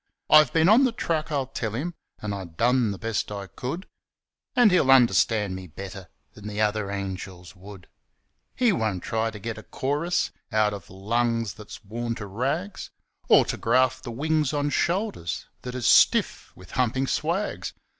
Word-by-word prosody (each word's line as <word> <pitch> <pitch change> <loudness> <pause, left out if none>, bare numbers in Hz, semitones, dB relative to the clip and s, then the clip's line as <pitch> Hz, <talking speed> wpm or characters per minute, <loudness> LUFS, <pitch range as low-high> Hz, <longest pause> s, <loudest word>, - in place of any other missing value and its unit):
'I've 155 -4 +7
been 160 0 +3
on 225 +7 +6
the 255 - +3
track,' 165 -8 -2
I'll 140 -3 0
tell 110 -4 -4
him, 165 +8 -3 0.3
'An' 105 -1 -2
I 95 -1 -5
done 120 +8 +1
the 100 - -4
best 110 -1 -2
I 100 -1 -5
could,' 135 - -6 0.7
And 245 -5 +6
he'll 175 -7 +3
understand 115 -5 +4
me 95 -1 -8
better 95 +2 -9 0.2
Than 105 0 -10
the 105 0 -5
other 105 -1 0
angels 95 -2 -6
would. 95 0 -12 0.7
He 245 -2 +3
won't 110 - -1
try 110 0 -1
to 110 - -9
get 110 +2 -5
a - - -9
chorus 150 +10 -1 0.2
Out 105 -1 +2
of 100 - -9
lungs 115 +2 -1
that's 105 +4 -11
worn 115 +3 -3
to 110 - -6
rags, 140 - -3 0.4
Or - - +6
to - - -3
graft 130 +2 +2
the - - -6
wings 150 +4 0
on 145 0 0
shoulders 175 - -1 0.2
That 125 0 -6
is 125 -2 -3
stiff - - +4
with 90 -1 -15
humpin' 130 +1 0
swags. 165 +9 -2
115 Hz, 175 wpm, -25 LUFS, 100-145 Hz, 0.7 s, I've